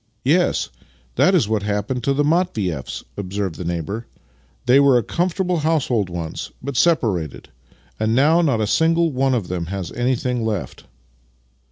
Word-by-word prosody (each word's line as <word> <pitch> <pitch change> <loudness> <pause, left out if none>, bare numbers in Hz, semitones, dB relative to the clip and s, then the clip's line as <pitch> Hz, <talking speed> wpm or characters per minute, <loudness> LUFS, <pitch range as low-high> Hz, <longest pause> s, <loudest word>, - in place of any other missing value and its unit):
" 110 - -44
Yes, 175 +7 +2 0.4
that - - +4
is - - +3
what 110 -1 0
happened 105 +4 -2
to 140 - +2
the 145 - +2
Matvieffs," 120 - -1
observed 100 -2 -3
the 90 - -7
neighbour. 85 +7 -4 0.3
" 65 - -36
They 125 +2 +6
were 140 -3 +5
a 120 - +1
comfortable 180 - -1
household 140 - +1
once, 85 -2 -5
but 140 +1 -5
separated 105 - +1 0.3
— - - -34
and 110 +1 +1
now 155 +6 +4
not 135 -9 +1
a - - +2
single 165 +8 +2
one 135 0 +1
of 105 -7 -2
them 85 -2 -3
has 95 -1 -4
anything 125 0 -1
left." 105 -5 -4
115 Hz, 170 wpm, -21 LUFS, 95-145 Hz, 0.4 s, They